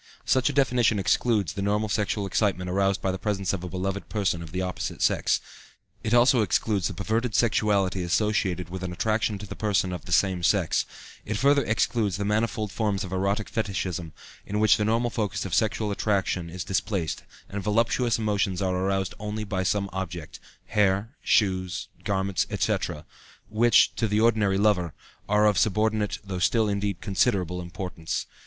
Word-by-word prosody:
Such 130 0 +3
a - - -3
definition 125 -5 +3
excludes 100 - +1
the 100 - -4
normal 105 +2 +1
sexual 105 0 -1
excitement 95 -2 0
aroused 100 +1 +1
by 95 - +1
the 95 - -4
presence 100 -4 -1
of 95 -2 -3
a 90 - -5
beloved 95 +2 -3
person 100 -5 0
of 80 -2 -9
the 95 +1 -2
opposite 90 0 -4
sex; - - +2 0.6
it 110 - -2
also 120 0 +5
excludes 100 -1 +1
the 95 - -6
perverted 110 +5 -1
sexuality 105 -5 +2
associated 90 -1 0
with 95 +1 -6
an 90 -1 -4
attraction 110 +2 0
to 105 +1 -9
a - - -1
person 100 -4 0
of 90 - -7
the - - -9
same 95 0 +2
sex; 90 -2 +2 0.4
it 110 0 -3
further 140 +3 +4
excludes 110 -4 0
the 100 - -2
manifold 105 0 0
forms 105 -3 -1
of 95 - -7
erotic 100 +3 0
fetichism, 90 -6 -3 0.3
in 105 +1 -3
which 110 +1 +5
the 105 - 0
normal 115 +2 +1
focus 105 -4 -2
of 95 - -5
sexual 110 -1 +1
attraction 95 -4 0
is 90 +1 -5
displaced, 95 -5 -2 0.3
and 100 0 -5
voluptuous 115 +3 +1
emotions 100 -4 0
are 95 -1 0
only 90 - -1 0.6
aroused 105 - -10
by 95 -2 -1
some 100 +2 0
object 90 -4 -5 0.3
hair, 100 0 +1
shoes, 95 -3 +1
garments, 95 -2 0
etc. 75 - -1 0.4
which, 115 +1 +4
to 115 - 0
the 105 +1 +1
ordinary 110 -4 +3
lover, 100 -6 +2 0.3
are 105 +1 +4
of 105 -2 +3
subordinate 110 0 +1
though 95 -2 -4
still, 110 +4 +2
indeed, 100 -3 -2
considerable 95 -3 0
importance. 90 -2 -4
100 Hz, 175 wpm, -26 LUFS, 95-110 Hz, 0.6 s, also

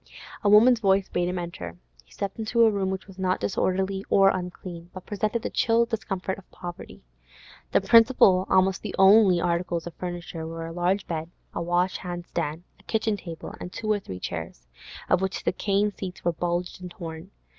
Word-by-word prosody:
A 205 - +4
woman's 230 +4 +7
voice 195 -2 +2
bade 175 0 0
him 180 - -3
enter. 90 - -6 0.3
He 60 - -29
stepped 200 +2 -5
into 225 +1 +2
a 220 - +5
room 195 -2 -1
which 190 0 -4
was 195 -1 -14
not 185 -1 +1
disorderly 190 0 0
or 195 -1 +6
unclean, 180 -2 -5
but 185 - -8
presented 215 +2 -2
the - - -3
chill 230 0 +3
discomfort 195 -5 -3
of 190 - -19
poverty. 175 - -9 0.7
The - - +4
principal, 225 -5 +5
almost 190 0 +3
the 210 - -5
only, 195 -1 +6
articles 170 0 -1
of 175 - -7
furniture 175 -2 -6
were 165 0 -6
a 165 - -6
large 180 +3 0
bed, 160 -1 -4 0.2
a - - -3
wash 175 +2 +1
hand 175 -1 -6
stand; 165 -1 -3 0.2
a - - -21
kitchen 220 -1 0
table, 170 -5 -8
and 180 - -7
two 215 +2 -2
or 210 - +2
three 95 - -8
chairs, 80 -9 -6 0.4
of 180 - +3
which 190 0 -2
the - - +1
cane 205 +1 +1
seats 190 -2 -8
were 175 - +2
bulged 175 +2 -2
and 180 - -6
torn. 165 0 -8
185 Hz, 195 wpm, -26 LUFS, 175-200 Hz, 0.7 s, woman's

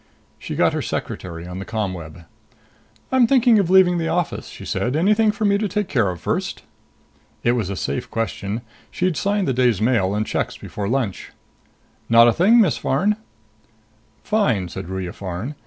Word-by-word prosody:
She - - -6
got - - +3
her - - -1
secretary 85 -2 -5
on 90 +1 -7
the - - -4
ComWeb. 90 -7 -5 0.9
"I'm 255 -3 +4
thinking 245 -3 +5
of 185 -4 0
leaving 180 -2 +5
the 165 - -1
office," 175 -2 -2
she - - -10
said. 125 +3 -1
"Anything 210 +6 +3
for 215 - -3
me 200 0 +3
to 215 - 0
take 205 +1 -2
care 115 -9 +1
of 90 -2 -5
first?" - - -3 0.8
It 120 - +3
was 115 -6 -1
a 100 - -3
safe 125 +6 -3
question. 115 -1 -3 0.3
She'd 180 -2 -1
signed 200 +5 0
the 135 - +1
day's 120 -5 +2
mail 110 -4 +1
and 105 +1 0
checks - - -2
before 100 -1 -5
lunch. 120 -7 -2 0.8
"Not 115 0 +7
a 120 - +4
thing, 210 - +5
Miss 195 -10 +3
Farn." 195 +11 +1 1.1
"Fine," 120 - +1
said 95 0 -7
Ruya 95 -2 -4
Farn. 95 +8 -5
125 Hz, 175 wpm, -21 LUFS, -, 1.1 s, Not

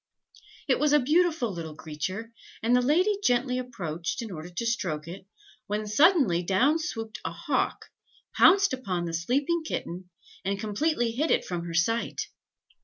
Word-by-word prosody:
It 265 - +2
was 295 0 +3
a 295 - +7
beautiful 310 - +2
little 160 -3 -6
creature, 185 +10 -5 0.3
and 235 +2 +4
the 250 - +4
lady 365 +10 +2
gently 250 -1 +2
approached, 175 -7 -4
in 220 - -7
order 165 0 -7
to 180 +6 -4
stroke 170 -10 -2
it, 185 +3 -9 0.4
when 210 +1 -2
suddenly 245 - +4
down 240 - +2
swooped 225 -10 -5
a - - -3
hawk, - - -1 0.5
pounced 390 -4 +6
upon 190 -9 -2
the 165 - -4
sleeping 270 - 0
kitten, 180 - -5 0.3
and 200 0 -1
completely 235 +3 0
hid 295 +7 -1
it - - +2
from 175 -1 -4
her 170 -1 -5
sight. 225 +8 0
230 Hz, 160 wpm, -27 LUFS, 175-285 Hz, 0.5 s, a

